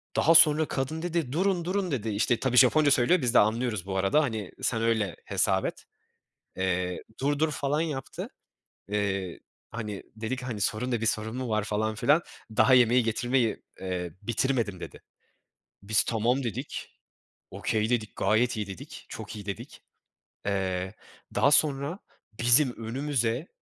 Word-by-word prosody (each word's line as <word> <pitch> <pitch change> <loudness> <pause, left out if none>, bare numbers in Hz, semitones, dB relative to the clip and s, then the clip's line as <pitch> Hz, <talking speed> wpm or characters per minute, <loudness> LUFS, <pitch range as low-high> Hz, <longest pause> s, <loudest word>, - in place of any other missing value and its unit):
daha 165 +2 +4
sonra 155 -1 +7
kadın 140 +4 -3
dedi, 170 -6 -2
durun 180 +2 0
durun, 185 0 -1
dedi 115 -5 -2
işte. 110 +3 +1
Tabii 125 -2 0
Japonca 145 +3 +6
söylüyor, 135 +6 +4
de 125 -1 +4
anlıyoruz 110 -2 +1
bu 95 -1 -3
arada. 95 +11 +3
Hani, 110 -8 -3
sen 115 -2 0
öyle 110 -5 0
hesap - - +1
et. - - -5 0.7
Eee, 90 -1 -1 0.2
dur 145 +1 0
dur 155 0 +2
falan 145 +1 -1
yaptı. 150 -5 -4 0.6
Eee, 100 -3 -2 0.3
hani, 105 -3 -5
dedik 120 +4 -4
hani 120 -5 -5
sorun 110 +5 -1
ne 120 -3 0
bir 115 - -1
sorun 110 +1 -1
mu 130 -1 -3
var 110 -1 0
falan 110 +1 -1
filan. 145 +9 +3 0.3
Daha 130 - +6
yemeği 125 0 +5
getirmeyi, 120 +1 0 0.2
eee, 90 -2 -4
bitirmedim 115 -4 -1
dedi. - - -9 0.8
Biz 105 +1 +2
tamam 120 +4 +1
dedik, 115 -6 -5 0.6
okay 110 +1 -1
dedik, 110 -3 -1
gayet 115 +2 +2
iyi 105 - -2
dedik, 95 -3 -10
çok - - -8
iyi 100 -1 -9
dedik. 100 -3 -7 0.6
Eee, 95 -1 -1 0.4
daha 140 - +4
sonra 145 +3 +2 0.4
bizim 120 +2 +5
önümüze 130 +2 -1
120 Hz, 150 wpm, -27 LUFS, 105-140 Hz, 0.8 s, sonra